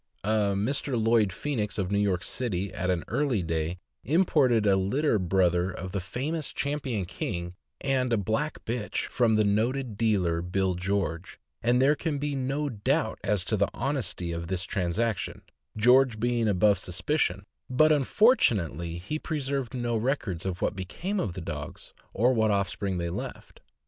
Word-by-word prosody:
A 105 -1 +1
Mr. 125 +3 0
Lloyd 110 -2 +3
Phoenix, 110 -1 -2
of 95 -2 -1
New 100 - +2
York 100 -2 +1
City, 100 -7 -2
at 95 - -2
an 90 -2 0
early 125 -6 0
day, 80 +1 -2 0.3
im 165 - +3
ported 125 -10 +3
a 100 -1 +5
litter 110 +6 +1
brother 90 -1 +2
of 95 0 -6
the 100 - -2
famous 140 - -3
Champion 140 -8 -2
King, 85 0 -4 0.3
and 130 -2 +1
a 115 - +3
black 110 +9 -2
bitch, 115 -2 -2
from 120 -3 +2
the 110 - +4
noted 110 +3 0
dealer 95 -7 +2
Bill 95 +1 0
George, 90 -2 -2 0.2
and 120 +1 +3
there 135 +3 +5
can 150 0 -2
be 145 +1 -2
no 135 +2 -1
doubt 130 +2 0
as 105 -2 0
to 110 - +1
the 100 -1 +1
honesty 125 -9 -2
of 85 0 -4
this 95 0 -1
transaction, 100 +3 -2 0.3
George 125 0 +5
being 120 0 +1
above 100 -1 +3
suspicion; 95 - -1 0.2
but, 155 +5 +4
unfortunately, 105 - +2
he 100 - -4
pre 155 -1 -3
served 135 -2 -2
no 120 -1 -1
records 110 - -1
of 90 -1 -3
what - - 0
became 170 - -3
of 100 - -2
the 90 - -6
dogs, - - -7 0.2
or 120 +5 +3
what 110 -2 +2
offspring 100 -1 -1
they 85 -1 -2
left. - - -7
110 Hz, 170 wpm, -28 LUFS, 95-130 Hz, 0.3 s, a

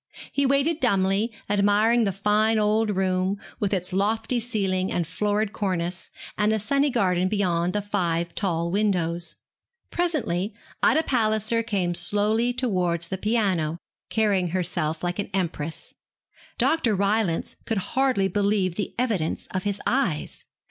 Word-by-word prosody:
He 280 -1 +1
waited 280 +4 +2
dumbly, 200 -1 +2 0.2
admiring 205 +3 +3
the 200 - +1
fine 210 +3 +2
old 215 +1 +2
room, 190 0 0 0.2
with 200 -2 0
its 185 -2 -1
lofty 220 +5 +1
ceiling, 195 -5 0
and 175 - 0
florid 205 +5 -1
cornice, 180 -3 -2 0.3
and 210 +1 +3
the 220 - +2
sunny 275 +7 +1
garden 185 -7 +1
beyond 180 -3 0
the 210 - -1
five 170 -4 -1
tall 170 -4 -1
windows. 175 -4 0 0.6
Presently 230 - -1 0.3
Ida 320 - +4
Palliser 220 -3 +1
came 195 -6 -1
slowly 210 +7 +2
towards 180 -9 0
the 190 - -2
piano, 190 -8 0 0.3
carrying 205 -5 +2
herself 165 -2 -1
like 175 +2 -2
an 200 - -3
empress. 165 -4 -3 0.6
Dr. 245 -10 +2
Rylance 200 -3 0
could 225 - 0 0.2
hardly 260 -7 +2
believe 200 -3 0
the 205 - -3
evidence 215 -10 -1
of 185 0 -3
his 205 -1 -1
eyes. 210 - -1
200 Hz, 135 wpm, -25 LUFS, 180-220 Hz, 0.6 s, Ida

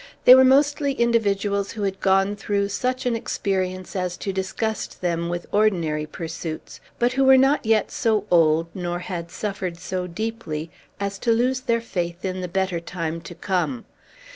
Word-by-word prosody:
They 250 - +11
were 260 0 +8
mostly 280 +2 +3
individuals 205 -5 +1
who 215 - -4
had 195 -1 -2
gone 195 +1 +3
through 200 0 -1
such 255 +5 -2
an 245 -2 +1
experience 185 -5 -2
as 180 -1 -2
to 195 - -4
disgust 195 +3 -3
them 170 -1 -1
with 175 0 -3
ordinary 170 -8 +1
pursuits, 165 0 -6 0.2
but 240 +1 +1
who 270 +1 +2
were 265 0 +7
not 270 -2 +3
yet 220 -2 +2
so 215 -3 +1
old, 165 -1 +4
nor 175 -2 -3
had 175 -1 -5
suffered 190 -3 -4
so 180 +1 -4
deeply, 175 -5 -4 0.3
as 200 0 -3
to 235 - +1
lose 250 +3 +2
their 230 -2 0
faith 175 -5 -4
in 185 0 -3
the 180 - -3
better 190 -1 -1
time 165 -1 -4
to 170 +1 -10
come. 190 +7 -2
195 Hz, 170 wpm, -23 LUFS, 175-230 Hz, 0.3 s, They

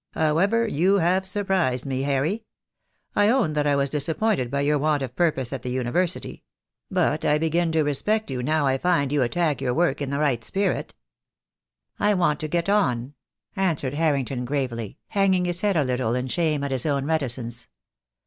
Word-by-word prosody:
How 155 0 +2
ever, 230 +5 +2
you 185 +2 +2
have 185 +2 +1
surprised 185 - 0
me, 135 -1 -2
Harry. 145 +10 0 0.7
I 205 0 +4
own 230 -11 +2
that 150 -1 0
I 145 - +3
was 140 -1 0
disappointed 160 - 0
by 140 +2 -1
your 145 +1 +2
want 150 -1 +1
of 125 -1 -6
purpose 140 -7 0
at 135 - -4
the 125 - -5
University; 130 +9 -2 0.5
but 170 -5 +1
I 150 - +3
begin 165 +2 0
to 160 -1 +3
respect 210 +7 -1
you 125 -1 -2
now 155 +3 +1
I 135 0 +1
find 165 -6 +1
you 145 -1 +2
attack 150 +3 0
your 125 - 0
work 175 -1 +1
in 140 - -2
the 140 - -2
right 140 -6 0
spirit." 195 - -2 1.0
"I 210 0 +3
want 170 -5 +1
to 155 - -3
get 170 +3 -1
on," 140 - +1 0.4
answered 165 -9 0
Harrington 140 -5 0
gravely, 125 -5 -3
hang 195 -1 +2
ing 180 -1 0
his 175 0 -1
head 205 -4 +1
a 150 - +3
little 125 -2 -1
in 125 +1 -2
shame 155 -2 0
at 140 - -2
his 130 +2 +1
own 140 -2 0
reticence. 125 -6 -2
150 Hz, 190 wpm, -24 LUFS, 130-180 Hz, 1.0 s, I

